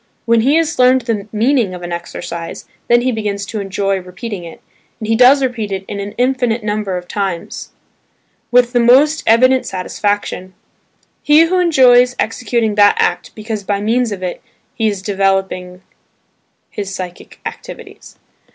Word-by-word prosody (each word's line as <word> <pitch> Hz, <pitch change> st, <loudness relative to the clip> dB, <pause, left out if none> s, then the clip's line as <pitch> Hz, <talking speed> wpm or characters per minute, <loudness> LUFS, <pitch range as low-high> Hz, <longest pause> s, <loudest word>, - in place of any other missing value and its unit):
When 230 Hz, -1 st, +3 dB
he 275 Hz, +6 st, +3 dB
has 330 Hz, -1 st, 0 dB
learned 255 Hz, +1 st, +5 dB
the 220 Hz, -4 st, -3 dB
meaning 225 Hz, -3 st, +1 dB
of 180 Hz, -, -9 dB
an 175 Hz, -, -6 dB
exercise, 170 Hz, -1 st, -6 dB, 0.2 s
then 240 Hz, 0 st, +4 dB
he 255 Hz, +1 st, 0 dB
begins 205 Hz, -3 st, -3 dB
to 215 Hz, +1 st, -5 dB
enjoy 195 Hz, 0 st, -1 dB
repeating 185 Hz, +2 st, -7 dB
it, 165 Hz, -, -11 dB, 0.4 s
and 215 Hz, -, -5 dB
he 225 Hz, -, +2 dB
does 260 Hz, +4 st, +6 dB
repeat 230 Hz, -5 st, -2 dB
it 190 Hz, 0 st, -4 dB
an 200 Hz, -, -5 dB
infinite 245 Hz, -1 st, 0 dB
number 210 Hz, -3 st, -2 dB
of 180 Hz, 0 st, -8 dB
times, 190 Hz, -4 st, -4 dB, 0.8 s
with 245 Hz, 0 st, +3 dB
the 245 Hz, -, +3 dB
most 275 Hz, +6 st, +4 dB
evident 255 Hz, +3 st, +4 dB
satisfaction. 190 Hz, 0 st, -3 dB, 0.7 s
He 300 Hz, +2 st, +5 dB
enjoys 265 Hz, -9 st, +4 dB
executing 225 Hz, 0 st, -1 dB
that 205 Hz, 0 st, +5 dB
act -, -, -1 dB
because 215 Hz, -1 st, -5 dB
by 200 Hz, 0 st, -1 dB
means 230 Hz, +3 st, 0 dB
of 190 Hz, -2 st, -5 dB
it 180 Hz, -, -4 dB, 0.3 s
he 225 Hz, -1 st, 0 dB
is 200 Hz, -3 st, -3 dB
developing 190 Hz, -2 st, -1 dB, 0.9 s
his 195 Hz, -2 st, -5 dB
psychic 180 Hz, -1 st, -9 dB
activities. -, -, -10 dB
215 Hz, 150 wpm, -16 LUFS, 195-245 Hz, 0.9 s, does